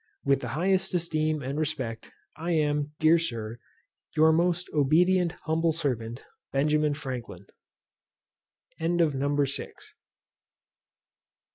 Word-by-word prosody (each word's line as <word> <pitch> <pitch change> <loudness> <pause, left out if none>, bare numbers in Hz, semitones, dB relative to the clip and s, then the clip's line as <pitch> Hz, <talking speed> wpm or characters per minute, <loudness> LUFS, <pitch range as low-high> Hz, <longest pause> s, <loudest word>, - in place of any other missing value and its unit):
With 140 0 +3
the - - -5
highest 190 +2 +1
esteem 155 -3 0
and 135 +3 -3
respect, 135 -8 -3 0.2
I 170 +3 -2
am, 150 -1 0
Dear 160 +2 +5
Sir, 115 -7 -4 0.6
Your 160 +1 +6
most 175 +2 +1
obedient 170 +4 +3
humble 160 +1 +1
servant, 125 -6 -3 0.3
B. 150 +2 +2
FRANKLIN. 125 -10 -6 1.3
NUMBER 145 -4 +1
VII. 140 - -5
150 Hz, 100 wpm, -27 LUFS, 140-165 Hz, 1.3 s, Your